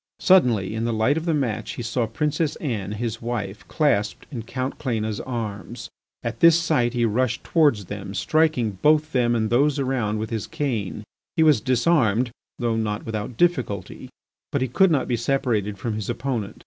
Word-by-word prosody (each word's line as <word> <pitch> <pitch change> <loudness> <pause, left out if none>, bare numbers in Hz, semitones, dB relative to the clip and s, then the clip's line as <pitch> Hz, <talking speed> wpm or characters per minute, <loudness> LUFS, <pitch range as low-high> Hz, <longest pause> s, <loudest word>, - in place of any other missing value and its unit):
Suddenly, 120 - +4
in 110 +1 -2
the 120 - 0
light 110 +6 +2
of 160 +1 -3
the 165 - +1
match, 115 -6 -2
he 120 - -5
saw 120 0 -1
Princess 150 +6 -1
Anne, 105 - -3
his 115 +1 -4
wife, 110 -4 -4
clasped 105 - 0
in 125 -5 -4
Count 130 +4 -4
Cléna's 110 -5 -2
arms. 115 -1 -5 0.3
At 115 -1 -4
this 170 -1 +7
sight 145 -8 +1
he 120 -1 +1
rushed 120 +2 0
towards 145 - +2
them, 100 0 -7
striking 125 -12 +1
both 155 +1 +3
them 120 -3 +2
and 110 -1 0
those 145 +4 +3
around 130 -6 0
with 110 +1 -4
his 110 -2 -3
cane. 120 - -3 0.3
He 160 - +5
was 155 -2 +5
disarmed, 125 -4 +2 0.3
though 115 -2 0
not 105 -1 -2
without 110 +1 -4
difficulty, 125 - -1 0.4
but 140 -4 0
he - - 0
could 190 +10 +4
not 145 -5 +1
be 120 - 0
separated 115 -5 0
from 110 +3 -3
his 105 0 -4
opponent. 120 -4 -3
120 Hz, 180 wpm, -23 LUFS, 110-140 Hz, 0.4 s, this